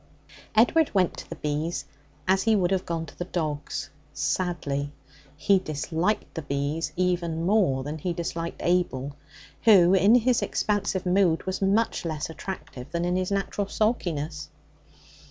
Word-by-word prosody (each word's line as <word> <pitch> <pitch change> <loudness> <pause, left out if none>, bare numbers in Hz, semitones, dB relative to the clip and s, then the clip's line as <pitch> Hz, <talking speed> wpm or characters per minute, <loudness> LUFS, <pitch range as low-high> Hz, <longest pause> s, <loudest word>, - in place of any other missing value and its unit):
Edward 290 +8 +4
went 185 -3 +3
to - - -9
the - - -5
bees 150 +3 -2 0.4
as 190 +1 +4
he 225 -1 +3
would 180 -3 +2
have 190 -1 0
gone 165 -1 -2
to 145 - -14
the 175 - -2
dogs 155 -5 -3 0.2
sadly. 145 -6 -1 0.5
He 195 +5 +4
disliked 165 +4 -2
the 165 - -4
bees 145 +3 -2
even 170 -2 0
more 180 -10 +2
than 150 +3 -5
he 180 +4 -2
disliked 170 0 -4
Abel, 145 -6 0 0.5
who 190 -5 +7
in 195 +4 +6
his 245 0 +3
expansive 205 -2 -1
mood 180 -3 +2
was 190 +1 -3
much 200 +3 +1
less 160 -1 -3
attractive 155 -7 -7
than 170 0 -1
in 180 0 +1
his 185 0 0
natural 200 0 -1
sulkiness. 165 -9 -1
175 Hz, 150 wpm, -26 LUFS, 155-195 Hz, 0.5 s, who